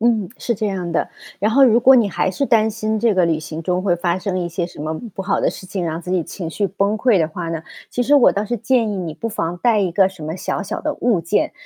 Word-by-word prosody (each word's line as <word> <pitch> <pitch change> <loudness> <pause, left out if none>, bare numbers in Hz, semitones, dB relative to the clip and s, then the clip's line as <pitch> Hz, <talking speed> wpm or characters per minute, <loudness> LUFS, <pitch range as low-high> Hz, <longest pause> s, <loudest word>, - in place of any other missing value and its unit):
嗯， 220 -5 +2
是 235 - -1
这 215 +1 -2
样 185 -4 -3
的。 165 - 0 0.3
然 210 +3 +1
后 270 +2 +6
如 235 -2 +5
果 260 +2 +7
你 235 -5 +4
还 190 - 0
是 280 - -1
担 220 -1 +3
心 220 0 -2
这 225 -2 +2
个 185 - +3
旅 160 -2 +1
行 155 +1 -7
中 180 +2 -1
会 185 -3 +2
发 175 +1 -1
生 185 -1 -2
一 175 - -2
些 175 0 -3
什 170 - -12
么 155 +1 -3 0.2
不 195 - -4
好 190 - 0
的 - - +2
事 185 - -10
情， 190 -1 -3
让 165 0 -3
自 180 - -7
己 185 -2 +1
情 170 -1 -6
绪 200 +5 -1
崩 200 +2 0
溃 235 -4 +3
的 160 -2 +1
话 170 +1 -5
呢， 165 -1 -4 0.3
其 245 - -1
实 280 +4 +3
我 280 -4 +6
倒 205 - -1
是 240 +3 -2
建 235 0 +1
议 205 - -3
你 170 -4 -4
不 230 - -4
妨 175 -5 -3
带 230 +1 +3
一 185 -4 0
个 190 +2 +4
什 190 -5 -11
么 160 +3 -4
小 190 - -3
小 195 - -4
的 305 -1 -2
物 235 -10 +1
件， 210 - 0
195 Hz, 315 characters per minute, -20 LUFS, 175-220 Hz, 0.3 s, 果